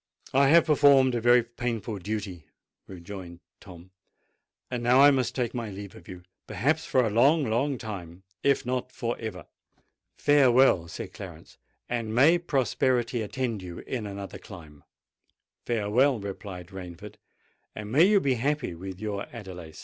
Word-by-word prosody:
"I 135 Hz, +1 st, +5 dB
have 165 Hz, +4 st, +6 dB
performed 140 Hz, -4 st, +5 dB
a 120 Hz, -, -1 dB
very 120 Hz, +1 st, +5 dB
painful 115 Hz, -3 st, -4 dB
duty," 95 Hz, -4 st, -5 dB, 0.4 s
rejoined 90 Hz, -1 st, -9 dB, 0.2 s
Tom: 90 Hz, -1 st, -14 dB, 0.8 s
"and 125 Hz, -1 st, -2 dB
now 125 Hz, +2 st, +4 dB
I 145 Hz, +1 st, +8 dB
must 130 Hz, -3 st, 0 dB
take 125 Hz, -3 st, -1 dB
my 120 Hz, -3 st, -4 dB
leave 100 Hz, 0 st, -8 dB
of -, -, -15 dB
you—perhaps 95 Hz, -, -3 dB
for 130 Hz, -2 st, +2 dB
a 110 Hz, -, -1 dB
long, 140 Hz, +7 st, +4 dB
long 130 Hz, +5 st, 0 dB
time—if 95 Hz, +5 st, -3 dB
not 125 Hz, 0 st, -3 dB
for 120 Hz, -1 st, -3 dB
ever." 100 Hz, -7 st, -6 dB, 0.7 s
"Farewell," 130 Hz, -, +4 dB
said 85 Hz, -, -8 dB
Clarence; -, -, -11 dB, 0.3 s
"and 115 Hz, -2 st, -3 dB
may 155 Hz, +8 st, +5 dB
prosperity 130 Hz, -6 st, 0 dB
attend 115 Hz, -1 st, -3 dB
you 90 Hz, -2 st, -8 dB
in 115 Hz, -5 st, -5 dB
another 100 Hz, -1 st, -7 dB
clime." 80 Hz, -7 st, -13 dB, 0.8 s
"Farewell," 120 Hz, +3 st, +2 dB
replied 95 Hz, -3 st, -8 dB
Rainford; 90 Hz, -3 st, -9 dB, 0.6 s
"and 105 Hz, 0 st, -7 dB
may 155 Hz, +8 st, +6 dB
you 205 Hz, +1 st, +5 dB
be 140 Hz, -7 st, +1 dB
happy 135 Hz, -, -1 dB
with 95 Hz, +2 st, -8 dB
your 105 Hz, -1 st, -4 dB
Adelais." 90 Hz, -8 st, -9 dB
115 Hz, 145 wpm, -27 LUFS, 95-130 Hz, 0.8 s, I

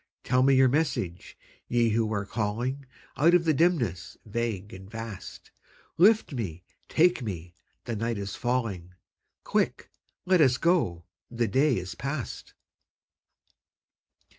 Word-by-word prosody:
Tell 125 Hz, 0 st, +2 dB
me 135 Hz, +1 st, +5 dB
your 130 Hz, 0 st, +6 dB
message, 120 Hz, -, -2 dB, 0.3 s
Ye 120 Hz, -1 st, +2 dB
who 110 Hz, 0 st, +1 dB
are 100 Hz, -2 st, -1 dB
calling 120 Hz, +6 st, -3 dB, 0.3 s
Out 170 Hz, +5 st, +5 dB
of 175 Hz, -1 st, +3 dB
the 160 Hz, -, +3 dB
dimness 130 Hz, -, 0 dB
vague 110 Hz, -2 st, -3 dB
and 95 Hz, +1 st, -11 dB
vast; 115 Hz, -3 st, -8 dB, 0.5 s
Lift 210 Hz, -2 st, +5 dB
me, 90 Hz, -9 st, -4 dB, 0.3 s
take 175 Hz, -1 st, +3 dB
me, 90 Hz, -6 st, -6 dB, 0.3 s
the 120 Hz, -, -4 dB
night 115 Hz, +1 st, -2 dB
is 100 Hz, -1 st, -5 dB
falling; 110 Hz, -8 st, -2 dB, 0.5 s
Quick, -, -, -1 dB, 0.3 s
let 185 Hz, -2 st, +4 dB
us 130 Hz, -4 st, +4 dB
go, 160 Hz, -, +1 dB, 0.3 s
the 120 Hz, -1 st, -1 dB
day 135 Hz, +5 st, +2 dB
is 95 Hz, +1 st, -5 dB
past. 140 Hz, -1 st, -5 dB
120 Hz, 130 wpm, -27 LUFS, 100-140 Hz, 0.5 s, your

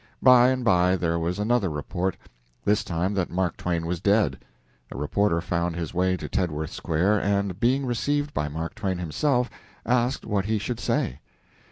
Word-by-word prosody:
By 125 Hz, -1 st, +8 dB
and 130 Hz, -2 st, -1 dB
by 90 Hz, -2 st, +4 dB
there 85 Hz, -2 st, 0 dB
was 85 Hz, +3 st, -2 dB
another 105 Hz, -1 st, +1 dB
report 85 Hz, +5 st, -3 dB, 0.5 s
this 105 Hz, 0 st, +2 dB
time 90 Hz, +3 st, -1 dB
that 95 Hz, -3 st, -1 dB
Mark 90 Hz, -2 st, -1 dB
Twain 85 Hz, -2 st, -2 dB
was 85 Hz, 0 st, -2 dB
dead. 100 Hz, -8 st, +2 dB, 0.5 s
A -, -, -7 dB
reporter 85 Hz, +4 st, +1 dB
found 85 Hz, -1 st, -1 dB
his 85 Hz, -2 st, -4 dB
way 90 Hz, +1 st, +1 dB
to -, -, -6 dB
Tedworth 80 Hz, -4 st, -2 dB
Square, 95 Hz, +6 st, +1 dB
and, 100 Hz, -2 st, 0 dB
being 130 Hz, +4 st, +2 dB
received 145 Hz, +4 st, -1 dB
by 75 Hz, -, -1 dB
Mark 80 Hz, +3 st, -4 dB
Twain 95 Hz, -4 st, -2 dB
himself, 125 Hz, -, 0 dB, 0.4 s
asked 125 Hz, +1 st, +1 dB
what 100 Hz, -3 st, 0 dB
he 110 Hz, +1 st, +1 dB
should 105 Hz, +4 st, -3 dB
say. 65 Hz, -, -1 dB
95 Hz, 175 wpm, -25 LUFS, 85-110 Hz, 0.5 s, By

